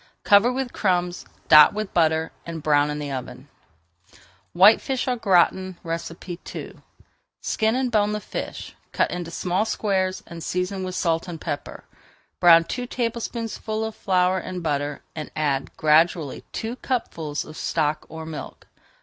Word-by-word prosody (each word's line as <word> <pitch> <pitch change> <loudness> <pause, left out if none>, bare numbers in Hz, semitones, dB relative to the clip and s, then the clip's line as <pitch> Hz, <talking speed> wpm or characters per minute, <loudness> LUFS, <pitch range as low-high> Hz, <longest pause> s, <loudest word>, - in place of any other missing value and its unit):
Cover 205 +4 +5
with 255 -1 -3
crumbs, 180 -3 0 0.2
dot 150 +5 +8
with 215 -2 -4
butter, 160 -1 +2
and 165 -2 -7
brown 145 -1 +3
in 150 - -3
the 145 -1 -4
oven. 130 +1 -7 1.1
WHITEFISH 220 +8 +5
AU 250 - +1
GRATIN 185 -3 +2
II 170 +1 -6 0.6
Skin 220 +1 0
and 255 -1 0
bone 210 -2 +2
the 210 - -2
fish, - - -6 0.2
cut - - +1
into 175 -1 -4
small 180 +3 0
squares, 190 -4 -1
and 170 -2 -9
season 180 +1 -2
with 185 0 -4
salt 165 -1 0
and 170 -2 -6
pepper. 145 - -5 0.6
Brown 170 -1 +7
two 245 +8 -4
tablespoonfuls 230 -2 -3
of 220 - -14
flour 185 -1 +2
in 185 -1 -6
butter, 145 -2 -2
and 155 -2 -5
add 140 -3 0
gradually 155 -1 +2
two 230 +3 -4
cupfuls 165 - -3
of 155 - -11
stock 150 -1 -1
or 160 0 -7
milk. 160 -1 -8
180 Hz, 145 wpm, -24 LUFS, 160-210 Hz, 1.1 s, dot